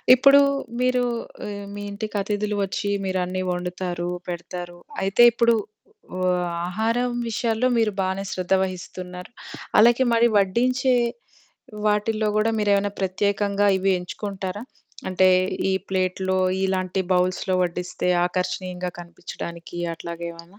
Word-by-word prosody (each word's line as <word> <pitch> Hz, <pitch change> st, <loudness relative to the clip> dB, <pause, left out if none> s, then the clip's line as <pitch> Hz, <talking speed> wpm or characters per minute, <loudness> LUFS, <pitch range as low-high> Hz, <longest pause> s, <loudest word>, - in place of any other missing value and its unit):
ఇప్పుడు 275 Hz, +2 st, +7 dB, 0.4 s
మీరు 250 Hz, 0 st, +2 dB, 0.4 s
హ్మ్. 205 Hz, -1 st, -6 dB
మీ 205 Hz, -, -6 dB
ఇంటికి 210 Hz, +1 st, -6 dB
అతిథులు 210 Hz, +1 st, -2 dB
వచ్చి 195 Hz, +1 st, -2 dB, 0.2 s
మీరన్నీ 185 Hz, 0 st, -1 dB
ఒండుతారు, 180 Hz, -1 st, -3 dB, 0.2 s
పెడతారు. 175 Hz, 0 st, -6 dB, 0.3 s
అయితే. 195 Hz, +5 st, +4 dB
ఇప్పుడు 235 Hz, 0 st, +4 dB, 0.6 s
ఓహ్! 180 Hz, -1 st, +1 dB, 0.2 s
ఆహారం 230 Hz, +6 st, 0 dB, 0.2 s
విషయాల్లో 225 Hz, +2 st, 0 dB
మీరు 225 Hz, -2 st, +2 dB
బానే 190 Hz, +1 st, -1 dB
శ్రద్ధ 185 Hz, 0 st, -1 dB
వహిస్తున్నారు. 180 Hz, +1 st, -7 dB, 0.5 s
అలాగే 240 Hz, +4 st, +6 dB
మరి 230 Hz, +1 st, +5 dB
వడ్డించే 250 Hz, +6 st, +2 dB, 0.9 s
వాటిల్లో 215 Hz, +1 st, +1 dB
గూడా 215 Hz, +1 st, +3 dB
మీరేమన్నా 205 Hz, -1 st, +2 dB
ప్రత్యేకంగా 200 Hz, +1 st, +1 dB
ఇవి 190 Hz, +1 st, +1 dB
ఎంచుకుంటారా? 195 Hz, +2 st, -5 dB, 0.5 s
అంటే, 185 Hz, 0 st, +4 dB, 0.4 s
ఈ -, -, +2 dB, 0.2 s
ప్లేట్‌లో 190 Hz, 0 st, 0 dB, 0.3 s
ఇలాంటి 190 Hz, 0 st, 0 dB
బౌల్స్‌లో 185 Hz, +1 st, +1 dB
వడ్డిస్తే 180 Hz, +1 st, -2 dB, 0.2 s
ఆకర్షణీయంగా 180 Hz, 0 st, -3 dB
కనిపిచ్చడానికి 170 Hz, 0 st, -8 dB, 0.2 s
అట్లాగ 170 Hz, +1 st, -8 dB
ఏమైనా? 170 Hz, +4 st, -15 dB
190 Hz, 110 wpm, -23 LUFS, 180-215 Hz, 0.9 s, ఇప్పుడు